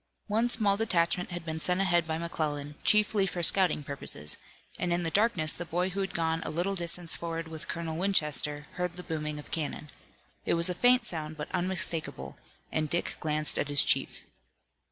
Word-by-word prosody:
One 225 Hz, +3 st, +1 dB
small 210 Hz, -4 st, +2 dB
detachment 180 Hz, -4 st, +1 dB
had 175 Hz, -2 st, -6 dB
been 160 Hz, -1 st, -4 dB
sent 180 Hz, +3 st, +1 dB
ahead 175 Hz, -3 st, +2 dB
by 160 Hz, 0 st, -1 dB
McClellan, 150 Hz, -3 st, -3 dB
chiefly 210 Hz, -2 st, +3 dB
for 175 Hz, -2 st, -3 dB
scouting 180 Hz, -4 st, +4 dB
purposes, 135 Hz, -, 0 dB, 0.4 s
and 175 Hz, -, -1 dB
in 175 Hz, 0 st, +1 dB
the 165 Hz, -, +1 dB
darkness 195 Hz, -7 st, +3 dB
the 175 Hz, -, -5 dB
boy 175 Hz, +2 st, -1 dB
who 195 Hz, +2 st, -3 dB
had 195 Hz, -1 st, -4 dB
gone 165 Hz, -1 st, 0 dB
a -, -, -3 dB
little 175 Hz, +5 st, -1 dB
distance 175 Hz, -2 st, 0 dB
forward 165 Hz, -1 st, -4 dB
with 160 Hz, -1 st, -8 dB
Colonel 165 Hz, -1 st, -4 dB
Winchester 150 Hz, -5 st, 0 dB
heard 180 Hz, -1 st, -2 dB
the 180 Hz, -, -6 dB
booming 150 Hz, -2 st, -3 dB
of 150 Hz, -, -10 dB
cannon. 150 Hz, -2 st, -3 dB, 0.5 s
It -, -, +1 dB
was 170 Hz, +2 st, +2 dB
a -, -, 0 dB
faint 245 Hz, +5 st, +4 dB
sound 155 Hz, -5 st, -4 dB
but 150 Hz, -, -7 dB
unmistakable, 180 Hz, -3 st, -1 dB, 0.3 s
and 155 Hz, -1 st, -1 dB
Dick 170 Hz, -, -2 dB
glanced 155 Hz, -1 st, +2 dB
at -, -, 0 dB
his 145 Hz, -1 st, +5 dB
chief. -, -, -1 dB
170 Hz, 190 wpm, -29 LUFS, 155-185 Hz, 0.5 s, his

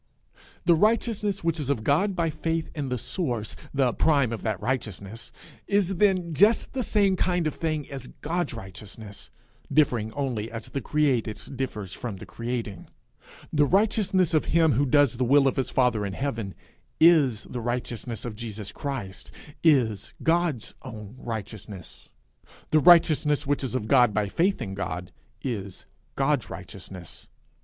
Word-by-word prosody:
The 175 Hz, -, +6 dB
righteousness 210 Hz, +1 st, +1 dB
which 165 Hz, -1 st, 0 dB
is 140 Hz, -3 st, -3 dB
of 120 Hz, -6 st, 0 dB
God 185 Hz, -, +2 dB
by 165 Hz, -2 st, 0 dB
faith 160 Hz, +1 st, -2 dB
in 145 Hz, -4 st, -3 dB
the 125 Hz, -, -1 dB
source, 120 Hz, -, -3 dB, 0.2 s
the 135 Hz, -4 st, +2 dB
prime 140 Hz, -7 st, +3 dB
of 115 Hz, -, -5 dB
that 110 Hz, -5 st, -2 dB
righteousness, 110 Hz, -4 st, -4 dB, 0.4 s
is 195 Hz, -2 st, +2 dB
then 185 Hz, -4 st, +2 dB
just 205 Hz, +9 st, +3 dB
the 265 Hz, -, -1 dB
same 200 Hz, -4 st, +3 dB
kind 180 Hz, -2 st, +1 dB
of 155 Hz, -, 0 dB
thing 155 Hz, -3 st, -2 dB
as 135 Hz, -3 st, -7 dB
God's 165 Hz, -4 st, -1 dB
righteousness, 100 Hz, +1 st, -9 dB, 0.4 s
differing 120 Hz, -8 st, +2 dB
only 120 Hz, -6 st, -2 dB
as 115 Hz, -1 st, -7 dB
the 140 Hz, -, -3 dB
created 130 Hz, -8 st, +1 dB, 0.2 s
differs 105 Hz, -8 st, -4 dB
from 115 Hz, -1 st, -5 dB
the 95 Hz, -, -9 dB
creating. 115 Hz, -5 st, -5 dB, 0.7 s
The 145 Hz, -1 st, +4 dB
righteousness 195 Hz, -2 st, +2 dB
of 155 Hz, -, +3 dB
him 165 Hz, -1 st, +3 dB
who 140 Hz, +3 st, +2 dB
does 140 Hz, -3 st, +4 dB
the 130 Hz, -, +1 dB
will 135 Hz, +2 st, +5 dB
of 130 Hz, -, +1 dB
his 135 Hz, -, 0 dB
father 125 Hz, -5 st, +2 dB
in 100 Hz, -1 st, -3 dB
heaven, 115 Hz, -5 st, -3 dB, 0.4 s
is 150 Hz, -10 st, +5 dB
the 125 Hz, -, -6 dB
righteousness 120 Hz, -1 st, -3 dB
of 115 Hz, -3 st, -5 dB
Jesus 105 Hz, -2 st, -6 dB
Christ, 120 Hz, -6 st, -5 dB, 0.3 s
is 120 Hz, -, +2 dB
God's 165 Hz, -7 st, +1 dB
own 105 Hz, -1 st, -9 dB
righteousness. 105 Hz, -5 st, -7 dB, 0.6 s
The 155 Hz, -, +5 dB
righteousness 155 Hz, -3 st, +5 dB
which 145 Hz, 0 st, 0 dB
is 130 Hz, -1 st, -3 dB
of 110 Hz, -4 st, -2 dB
God 120 Hz, -4 st, +5 dB
by 105 Hz, -2 st, +1 dB
faith 185 Hz, -, +1 dB
in 95 Hz, -, -5 dB
God, 90 Hz, -2 st, -4 dB, 0.3 s
is 100 Hz, -7 st, -4 dB, 0.3 s
God's 135 Hz, -2 st, +1 dB
righteousness. 90 Hz, 0 st, -9 dB
130 Hz, 155 wpm, -26 LUFS, 110-160 Hz, 0.7 s, The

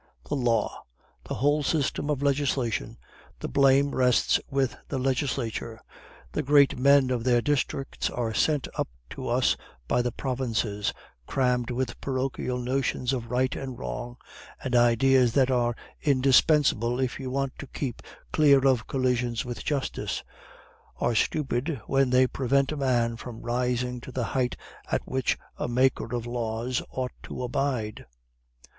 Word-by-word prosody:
The 145 Hz, -, -1 dB
law! 120 Hz, -5 st, 0 dB, 0.4 s
the -, -, -4 dB
whole 145 Hz, +6 st, +2 dB
system 145 Hz, 0 st, 0 dB
of 140 Hz, -2 st, 0 dB
legislation. 135 Hz, -, 0 dB, 0.4 s
The -, -, -4 dB
blame 140 Hz, 0 st, +4 dB
rests 125 Hz, -2 st, +3 dB
with 135 Hz, -2 st, 0 dB
the -, -, -3 dB
legislature. 130 Hz, -4 st, -2 dB, 0.5 s
The -, -, -1 dB
great 145 Hz, -1 st, +5 dB
men 140 Hz, -1 st, +5 dB
of 120 Hz, -2 st, -1 dB
their 120 Hz, -1 st, +4 dB
districts 135 Hz, +1 st, -1 dB
are 115 Hz, -2 st, -2 dB
sent 150 Hz, +5 st, +1 dB
up -, -, +1 dB, 0.2 s
to -, -, -6 dB
us -, -, +2 dB, 0.3 s
by 120 Hz, -, +2 dB
the 120 Hz, 0 st, -1 dB
provinces, 115 Hz, -6 st, -1 dB, 0.4 s
crammed 125 Hz, -2 st, +1 dB
with 125 Hz, +1 st, -3 dB
parochial 130 Hz, -1 st, -2 dB
notions 125 Hz, 0 st, -1 dB
of 120 Hz, -3 st, -4 dB
right 130 Hz, +2 st, +1 dB
and 130 Hz, -3 st, -5 dB
wrong; 120 Hz, 0 st, -5 dB, 0.5 s
and 125 Hz, -2 st, -1 dB
ideas 120 Hz, +1 st, +4 dB
that 135 Hz, -1 st, +3 dB
are 120 Hz, -2 st, +1 dB, 0.3 s
indispensable 135 Hz, -3 st, +3 dB
if 130 Hz, -2 st, -1 dB
you 130 Hz, -2 st, -4 dB
want 135 Hz, 0 st, -1 dB
to 140 Hz, -, -7 dB
keep 130 Hz, -2 st, -4 dB, 0.3 s
clear 140 Hz, -3 st, +5 dB
of 125 Hz, -4 st, +2 dB
collisions 125 Hz, -3 st, 0 dB
with 120 Hz, -3 st, -5 dB
justice, 140 Hz, -3 st, -2 dB, 0.7 s
are 120 Hz, -, +1 dB
stupid 135 Hz, +3 st, 0 dB
when 135 Hz, -1 st, +2 dB
they 130 Hz, +1 st, +5 dB
prevent 135 Hz, +2 st, +1 dB
a -, -, -2 dB
man 120 Hz, -4 st, +1 dB
from 115 Hz, -1 st, -8 dB
rising 125 Hz, 0 st, -1 dB
to 130 Hz, -, -9 dB
the 125 Hz, -1 st, -2 dB
height 125 Hz, +1 st, -1 dB, 0.3 s
at -, -, +1 dB
which 130 Hz, -1 st, 0 dB, 0.2 s
a -, -, -2 dB
maker 125 Hz, -1 st, +1 dB
of 120 Hz, -, -2 dB
the 120 Hz, -, -7 dB
laws 120 Hz, +1 st, -2 dB
ought 130 Hz, -1 st, -3 dB
to 125 Hz, -, -6 dB
abide. 125 Hz, -4 st, -2 dB
130 Hz, 150 wpm, -27 LUFS, 120-135 Hz, 0.7 s, great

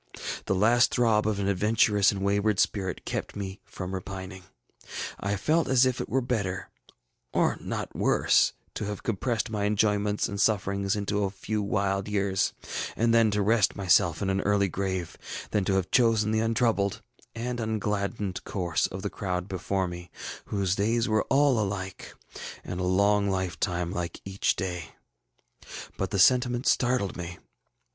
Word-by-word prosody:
The 95 Hz, -, +1 dB
last 115 Hz, +4 st, +4 dB
throb 110 Hz, -3 st, +3 dB
of 105 Hz, -2 st, 0 dB
an 100 Hz, -1 st, -1 dB
adventurous 105 Hz, +1 st, +3 dB
and 100 Hz, -2 st, -4 dB
wayward 100 Hz, +1 st, +1 dB
spirit 95 Hz, -3 st, 0 dB
kept -, -, -4 dB
me 95 Hz, -1 st, -6 dB
from 90 Hz, 0 st, -6 dB
repining. 95 Hz, 0 st, -6 dB, 0.7 s
I 100 Hz, +1 st, -1 dB
felt 155 Hz, -, +1 dB
as 130 Hz, -1 st, +5 dB
if 130 Hz, -1 st, 0 dB
it -, -, -5 dB
were 135 Hz, -, +1 dB
better, 100 Hz, -7 st, -2 dB, 0.6 s
or -, -, +2 dB
not -, -, -4 dB
worse, -, -, +3 dB, 0.2 s
to -, -, -4 dB
have 105 Hz, -1 st, -5 dB
compressed 115 Hz, +1 st, -1 dB
my 105 Hz, -2 st, -1 dB
enjoyments 105 Hz, 0 st, +1 dB
and 100 Hz, 0 st, -3 dB
sufferings 100 Hz, -2 st, +1 dB
into 105 Hz, 0 st, -1 dB
a 100 Hz, -, +1 dB
few 105 Hz, +2 st, -3 dB
wild 100 Hz, -1 st, 0 dB
years, 100 Hz, -2 st, +1 dB, 0.4 s
and 115 Hz, +1 st, +2 dB
then 115 Hz, -1 st, +5 dB
to 105 Hz, -1 st, +1 dB
rest 110 Hz, -1 st, +3 dB
myself 95 Hz, -2 st, +3 dB
in 95 Hz, -, +1 dB
an 95 Hz, 0 st, 0 dB
early 100 Hz, -1 st, +2 dB
grave, 95 Hz, -2 st, -3 dB, 0.3 s
than 105 Hz, -3 st, +1 dB
to 100 Hz, -, +1 dB
have 95 Hz, -2 st, -1 dB
chosen 115 Hz, -3 st, +3 dB
the 110 Hz, -, +2 dB
untroubled 115 Hz, -3 st, +1 dB, 0.3 s
and 120 Hz, +1 st, -3 dB
ungladdened 105 Hz, -2 st, -2 dB
course 85 Hz, -5 st, -1 dB
of 95 Hz, +1 st, -7 dB
the 100 Hz, -, -1 dB
crowd 90 Hz, -2 st, -3 dB
before 95 Hz, 0 st, -1 dB
me, 90 Hz, 0 st, -8 dB, 0.4 s
whose 100 Hz, -3 st, 0 dB
days 115 Hz, +4 st, +1 dB
were 110 Hz, -1 st, +1 dB
all 135 Hz, -3 st, +4 dB
alike, 95 Hz, -2 st, -4 dB, 0.5 s
and 90 Hz, -, -5 dB
a -, -, -1 dB
long 100 Hz, +2 st, +3 dB
lifetime 90 Hz, -2 st, -1 dB
like 90 Hz, -3 st, -4 dB
each 95 Hz, 0 st, 0 dB
day. 90 Hz, -3 st, -5 dB, 1.0 s
But 95 Hz, -, -2 dB
the 100 Hz, -, -2 dB
sentiment 125 Hz, +4 st, +4 dB
startled 120 Hz, -5 st, +2 dB
me. 90 Hz, 0 st, -6 dB
100 Hz, 160 wpm, -27 LUFS, 95-110 Hz, 1.0 s, as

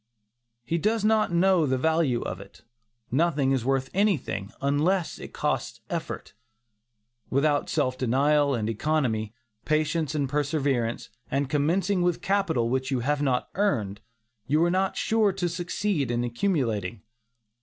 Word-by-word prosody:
He 165 Hz, +8 st, -1 dB
does 215 Hz, +3 st, +1 dB
not 215 Hz, -3 st, +3 dB
know 175 Hz, -2 st, +3 dB
the 130 Hz, 0 st, +1 dB
value 160 Hz, -4 st, +1 dB
of -, -, -5 dB
it; 100 Hz, -, -15 dB, 0.5 s
nothing 140 Hz, -1 st, +2 dB
is 130 Hz, -3 st, +1 dB
worth 135 Hz, +1 st, 0 dB
anything, 150 Hz, -, 0 dB
unless 155 Hz, +6 st, 0 dB
it -, -, -9 dB
costs -, -, -2 dB
effort. -, -, -5 dB, 1.0 s
Without 145 Hz, +2 st, +1 dB
self 130 Hz, 0 st, 0 dB
denial 140 Hz, +3 st, +2 dB
and 110 Hz, -2 st, -2 dB
economy, 115 Hz, -3 st, -1 dB, 0.3 s
patience 155 Hz, 0 st, 0 dB
and 145 Hz, -2 st, 0 dB
perseverance, 140 Hz, -4 st, -1 dB, 0.2 s
and 140 Hz, 0 st, -1 dB
commencing 175 Hz, +6 st, +1 dB
with 175 Hz, -1 st, +1 dB
capital 190 Hz, -12 st, +1 dB
which 130 Hz, +2 st, -1 dB
you 130 Hz, -3 st, 0 dB
have 145 Hz, +3 st, 0 dB
not 130 Hz, -3 st, 0 dB
earned, 105 Hz, -, 0 dB, 0.5 s
you 150 Hz, +4 st, +3 dB
are 175 Hz, -, +2 dB
not 190 Hz, +1 st, 0 dB
sure 220 Hz, -2 st, +2 dB
to 185 Hz, -2 st, -1 dB
succeed 175 Hz, -, -1 dB
in 120 Hz, 0 st, 0 dB
accumulating. 120 Hz, -, -1 dB
145 Hz, 140 wpm, -26 LUFS, 130-175 Hz, 1.0 s, not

